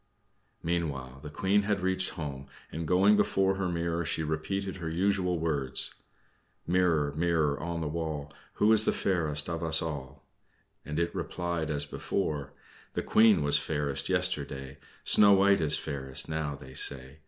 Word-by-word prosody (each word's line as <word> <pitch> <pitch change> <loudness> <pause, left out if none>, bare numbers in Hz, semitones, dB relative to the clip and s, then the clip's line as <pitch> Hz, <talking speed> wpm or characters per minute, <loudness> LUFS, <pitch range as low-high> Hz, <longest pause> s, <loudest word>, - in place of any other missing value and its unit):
Meanwhile, 70 -6 -3
the 75 - -8
Queen 95 +7 +1
had 105 -1 -1
reached 95 0 +1
home, 70 -5 -6 0.2
and, 80 +1 -4
going 95 +4 +5
before 95 -1 +2
her 95 -2 -1
mirror, 85 0 -1
she 80 0 -1
repeated 95 +5 -3
her 85 -3 -4
usual 90 +1 +1
words: 75 -5 -1 0.7
"Mirror, 85 -5 +2
mirror 80 -3 +1
on 85 +1 -4
the 80 - -2
wall, 75 -2 -4 0.2
Who 105 +2 +3
is 110 0 +5
the - - +2
fairest 80 -6 0
of 85 -1 -3
us 80 -1 +3
all?" 75 -5 -6 0.6
and 75 0 -5
it 85 0 0
replied 85 -3 -3
as 75 -1 -1
before: 75 -2 -3 0.4
"The - - -2
Queen 110 -8 +4
was 75 0 +3
fairest 70 -2 -2
yesterday; 65 0 -2 0.2
Snow 100 -1 +6
White 100 0 +4
is 75 -1 +3
fairest 65 -3 -1
now, 80 -2 -3
they 65 -2 -12
say. 65 +2 -1
80 Hz, 155 wpm, -29 LUFS, 75-90 Hz, 0.7 s, Snow